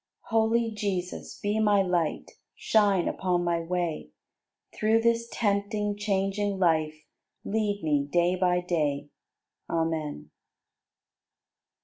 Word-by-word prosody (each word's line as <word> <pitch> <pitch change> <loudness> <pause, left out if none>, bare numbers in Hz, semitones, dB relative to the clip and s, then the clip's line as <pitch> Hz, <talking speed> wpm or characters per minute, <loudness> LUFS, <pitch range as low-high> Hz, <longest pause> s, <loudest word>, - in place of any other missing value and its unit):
79. 225 - +4
Holy 225 +1 +2
Jesus, 195 -4 -4
be 205 +1 0
my 205 -2 +4
Light, 175 -4 -1 0.2
Shine 200 -5 +2
upon 180 -2 0
my 170 -1 +1
way; 165 - -3 0.7
Through 220 +1 +2
this 235 0 +1
tempting, 205 -1 0
changing 200 -1 -1
life 155 -4 +1 0.4
Lead 205 -2 -1
me 145 -2 +1
day 175 +1 +3
by 180 -1 +2
day. 150 -5 -1 0.6
Amen. 155 - -2
185 Hz, 105 wpm, -27 LUFS, 165-210 Hz, 0.7 s, 79